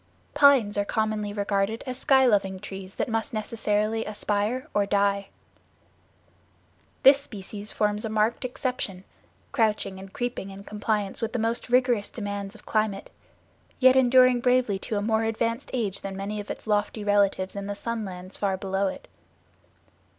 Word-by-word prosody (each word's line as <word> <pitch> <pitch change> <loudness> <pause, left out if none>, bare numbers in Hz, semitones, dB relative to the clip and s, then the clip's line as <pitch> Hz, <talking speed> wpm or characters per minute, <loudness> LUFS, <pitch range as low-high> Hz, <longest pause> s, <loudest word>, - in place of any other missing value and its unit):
Pines 255 -8 +5
are - - +2
commonly 215 -1 -1
regarded 205 +1 -1
as 255 -1 -4
sky 265 0 +4
loving 195 -5 +2
trees 195 -1 -8
that - - -1
must 225 +2 -2
necessarily 215 0 0
aspire 215 +5 -2
or 205 -1 +2
die. 200 -1 +1 1.8
This 275 +1 +7
species 205 -3 -8
forms 210 0 0
a 220 - -2
marked 220 +3 +1
exception, 250 -7 -3 0.5
crouching 215 -6 0
and 190 0 -10
creeping 245 -4 -4
in 195 +1 -10
compliance 210 0 -2
with 225 - -2
the - - 0
most 230 +2 -1
rigorous 245 -4 +3
demands 205 -1 -5
of - - -16
climate; 215 -2 -1 0.7
yet 260 -1 +6
enduring 255 -1 +5
bravely 250 -5 +2
to 210 - -3
a 205 - -1
more 220 +1 +1
advanced 230 +3 -1
age 215 -6 -2
than 195 -1 -5
many 205 +2 -4
of 205 - -7
its - - -6
lofty 210 0 0
relatives 200 -2 +2
in 200 0 -4
the 205 - -3
sun 230 +1 -3
lands 185 -1 -8
far 195 -2 -1
below 195 +1 -1
it. - - -6
210 Hz, 160 wpm, -26 LUFS, 200-230 Hz, 1.8 s, This